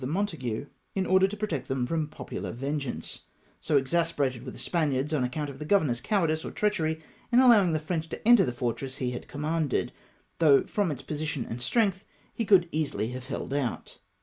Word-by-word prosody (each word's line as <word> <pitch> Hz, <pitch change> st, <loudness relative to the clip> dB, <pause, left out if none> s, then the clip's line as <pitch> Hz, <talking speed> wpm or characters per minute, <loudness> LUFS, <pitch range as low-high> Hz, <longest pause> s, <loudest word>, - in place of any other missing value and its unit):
269 130 Hz, -, -2 dB
Montague^ -, -, -16 dB, 0.3 s
in 190 Hz, -1 st, +1 dB
order 190 Hz, +1 st, +5 dB
to 210 Hz, +2 st, -6 dB
protect 170 Hz, -11 st, -3 dB
him 135 Hz, -2 st, 0 dB
from 160 Hz, +2 st, -1 dB
popular -, -, -6 dB
ven 140 Hz, +5 st, -2 dB
geance, 120 Hz, -, -5 dB, 0.4 s
so 150 Hz, -, +2 dB
exasperated 140 Hz, -4 st, 0 dB
were 130 Hz, -, -6 dB
the -, -, -10 dB
Spaniards 150 Hz, -3 st, 0 dB
on 145 Hz, -4 st, +2 dB
account 145 Hz, +3 st, -2 dB
of 135 Hz, -, -12 dB
the -, -, -4 dB
governor's 150 Hz, -9 st, +2 dB
cowardice 160 Hz, -1 st, +1 dB
or -, -, -4 dB
treachery 160 Hz, -7 st, 0 dB, 0.3 s
in 240 Hz, -, +4 dB
allowing 220 Hz, -9 st, +6 dB
the 155 Hz, -, +1 dB
French 160 Hz, +1 st, -3 dB
to -, -, -5 dB
enter 240 Hz, -4 st, +8 dB
the 125 Hz, -, -1 dB
fortress 125 Hz, +2 st, -3 dB
he 125 Hz, -2 st, -2 dB
had 120 Hz, -, -6 dB
commanded, 150 Hz, -1 st, -1 dB, 0.5 s
though 145 Hz, -5 st, +6 dB
from 205 Hz, -4 st, 0 dB
its 140 Hz, -4 st, -5 dB
position 150 Hz, -4 st, -3 dB
and 120 Hz, +2 st, -5 dB
strength 195 Hz, -, +1 dB, 0.3 s
he 230 Hz, -, -2 dB
could 190 Hz, -4 st, +5 dB
easily 150 Hz, -7 st, -1 dB
have 125 Hz, 0 st, -6 dB
held 135 Hz, 0 st, -4 dB
out. 140 Hz, -4 st, -3 dB
150 Hz, 200 wpm, -28 LUFS, 130-180 Hz, 0.5 s, enter